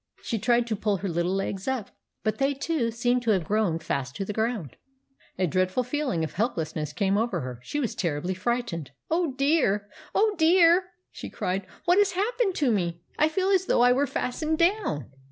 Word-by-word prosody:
She 230 - -2
tried 240 +3 +3
to 230 -2 -1
pull 205 -1 0
her 195 - -4
little 175 +2 0
legs 195 +1 -3
up; 260 -6 -2 0.3
but 215 +3 -1
they, 275 +1 +2
too, 275 -4 -1
seemed 245 +2 +1
to 235 - -2
have 190 -5 +3
grown 200 -2 +1
fast 140 -4 -3
to 195 - -3
the 210 - -4
ground. 220 - -2 0.6
A 185 - +2
dreadful 185 - +1
feeling 255 - -1
of 160 - -4
helplessness 160 - -2
came 195 +5 +1
over 220 -7 -1
her. 125 -2 -6
She 290 - -4
was 250 -6 -1
terribly 170 +1 -2
frightened. 190 - -2
" - - -53
Oh, 330 -4 +1
dear! 265 -8 +2 0.3
Oh, 430 0 +3
dear! 340 +2 +5
" - - -52
she - - -8
cried. 185 +1 -3
" - - -27
What 355 +3 +5
has 405 -2 +3
happened 420 +1 0
to 275 -5 +2
me? 170 -5 -1 0.2
I 305 - +4
feel 375 +4 0
as 375 -1 +2
though - - +3
I 245 0 +6
were 280 +3 +1
fastened 310 +4 -1
down." 335 - +1
230 Hz, 210 wpm, -26 LUFS, 185-295 Hz, 0.6 s, I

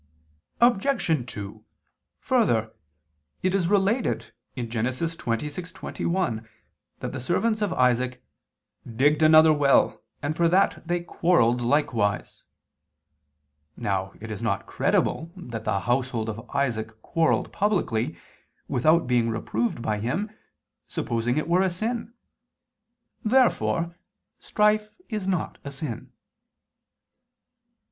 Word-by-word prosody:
Obj. 200 - +2
2: 105 +1 -7 0.6
Further, 120 - +1 0.7
it 185 0 +2
is 190 -4 +2
related 205 +5 +1 0.3
(Gen. 120 -2 -3 0.2
26:21) 150 - -2 0.5
that - - -3
the - - -5
servants 215 - 0
of 205 -3 0
Isaac 125 -2 +1 0.7
"digged" 145 +5 +3
another 155 0 +7
well, 145 -2 +3 0.2
"and 145 +2 -1
for 170 0 +3
that 185 +3 +3
they 175 0 0
quarrelled 165 -9 +2
likewise." 120 -5 0 1.4
Now 95 -1 -2
it 110 0 -7
is 110 - -5
not 105 -5 -1
credible 165 +1 0
that 115 - -7
the 100 -2 0
household 120 -2 0
of 110 +1 -7
Isaac 110 -5 -2
quarrelled 165 -1 +1
publicly, 150 - 0 0.5
without 155 +6 +3
being 120 -2 +2
reproved 115 +1 -2
by 105 -1 -1
him, 165 - -2 0.6
supposing 120 +3 -1
it 155 - -1
were 175 +2 +3
a 190 - +3
sin. 225 +5 -3 1.1
Therefore 215 -8 +2 0.4
strife 210 0 +2 0.2
is 210 -5 -3
not 185 -4 -1
a 140 - -5
sin. 135 -4 -6
145 Hz, 105 wpm, -25 LUFS, 115-185 Hz, 1.4 s, another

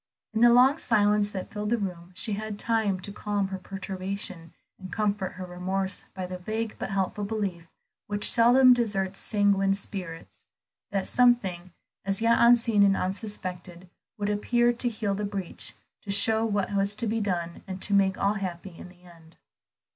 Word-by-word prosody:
In 220 - 0
the 240 - +8
long 260 +5 +5
silence 210 -2 +2
that 190 -3 -6
filled 210 0 -3
the 235 - +2
room 180 -4 -5
she 215 +3 0
had 215 0 -4
time 220 -4 0
to 200 - -6
calm 205 -1 -2
her 190 -1 -5
perturbation 190 -2 -4 0.3
and 185 -2 -9
comfort 205 -1 -1
her 185 0 -7
remorse 190 +2 -3
by 185 -1 -4
the 180 0 -7
vague 220 +4 -4
but - - -4
helpful 195 +1 -2
belief 200 -5 -3 0.4
which 205 0 0
seldom 250 +2 +6
deserts 200 -5 -1
sanguine 200 -2 +2
spirits, 180 -4 -8 0.4
that 195 -1 -1
something, 195 -8 +2 0.3
as 195 0 0
yet 230 +1 +3
unseen 235 -3 +5
and 195 -1 +4
unsuspected, 185 -3 -5 0.3
would 205 0 -1
appear 240 +3 +2
to 240 +1 0
heal 215 -3 -2
the 205 +2 -3
breach, 200 -3 -2 0.3
to 205 - -14
show 220 +3 +2
what 205 -2 -1
was 200 +1 +1
to 235 - -2
be 225 +1 -1
done, 175 -4 -3
and 190 0 -6
to 205 - +3
make 195 -1 +3
all 200 +1 +1
happy 185 -3 -6
in 180 - -11
the 180 0 -20
end. 165 -2 -18
200 Hz, 175 wpm, -27 LUFS, 185-215 Hz, 0.4 s, the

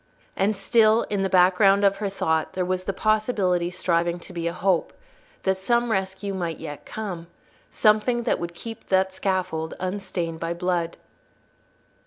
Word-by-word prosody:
And 200 +2 +1
still, 220 +2 +4
in 200 -2 0
the 195 - 0
background 190 +2 +5
of 195 0 +3
her 200 -1 -2
thought, 160 -5 -1
there 185 -1 -1
was 185 0 -2
the - - 0
possibility 200 -4 +1
striving 170 -1 0
to 185 - -12
be 170 -1 -2
a - - 0
hope, 180 0 0 0.5
that 190 0 +1
some 235 +4 +1
rescue 190 0 -2
might 170 -3 -3
yet 150 -2 -8
come, 185 -6 -5 0.4
something 220 +3 +2
that - - 0
would 170 0 -5
keep 225 +5 -8
that 190 0 +2
scaffold 185 -4 -2
unstained 180 -3 -3
by 165 +1 -2
blood. 175 -1 -1
190 Hz, 160 wpm, -24 LUFS, 175-205 Hz, 0.5 s, background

